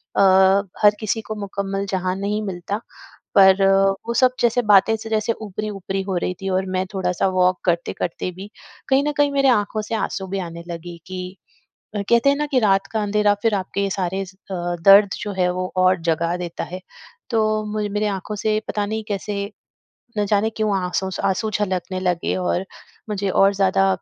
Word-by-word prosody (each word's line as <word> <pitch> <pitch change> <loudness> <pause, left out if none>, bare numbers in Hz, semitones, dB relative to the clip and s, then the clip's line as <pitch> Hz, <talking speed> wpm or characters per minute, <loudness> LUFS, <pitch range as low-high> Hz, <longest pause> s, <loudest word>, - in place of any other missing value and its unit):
अ, - - +3 0.6
हर 210 - +8
किसी 220 +1 -1
को 215 0 -6
मुकम्मल 200 0 -3
जहाँ 185 -1 -1
नहीं 205 +2 -2
मिलता। 185 +2 -3 0.6
पर 190 0 +6 0.4
वो 235 - -1
सब 255 +1 +4
जैसे 240 +1 +2
बातें 210 0 +5
से 220 +1 -8
जैसे 220 +1 +1
ऊपरी-ऊपरी 200 -2 -4
हो 190 -1 -3
रही 180 - -1
थी 195 - -2
और 190 0 0
मैं 185 - 0
थोड़ा-सा 180 -1 0
वॉक 180 0 +3
करते-करते 175 0 -1
भी, 190 +3 -10 0.4
कहीं 270 +1 +4
न - - +1
कहीं 290 -1 +3
मेरे 275 -1 +2
आँखों 215 -2 +1
से 215 +2 -4
आँसू 195 -2 -3
भी 195 +1 -3
आने 170 -2 -6
लगी 170 0 -7
कि 185 0 -6 0.6
अ, 205 - -1
कहते 235 +3 +4
हैं 280 - +3
ना 295 - 0
कि 260 - +4
रात 195 -3 +2
का 220 - -1
अंधेरा 205 0 +2
फिर 225 -2 +3
आपके 195 +1 -2
सारे 190 0 -2
स 190 +1 -15 0.2
अ, 175 -1 -2
दर्द 200 +1 +8
जो 205 - -4
है, 180 -1 +1
वो 185 0 -3
और 185 0 +4
जगा 165 +1 0
देता 175 -2 -5
है। 185 +1 -7 0.5
तो 215 -2 +1
मुझे 210 -1 -1
मेरे 210 +1 -1
आँखों 200 +1 -4
से 215 +1 0
पता 205 -1 -1
नहीं 220 +1 -3
कैसे, 205 0 -3 0.8
ना 210 - +2
जाने 205 +2 +2
क्यों, 215 -2 -1
आँसू 185 +1 -2
स - - -6
आँसू 195 +3 0
झलकने 185 -2 -2
लगे 180 -2 0
और 180 0 -1 0.4
मुझे 200 -1 -1
और 195 +1 +4
ज़्यादा 195 0 +3
195 Hz, 190 wpm, -21 LUFS, 185-215 Hz, 0.8 s, हर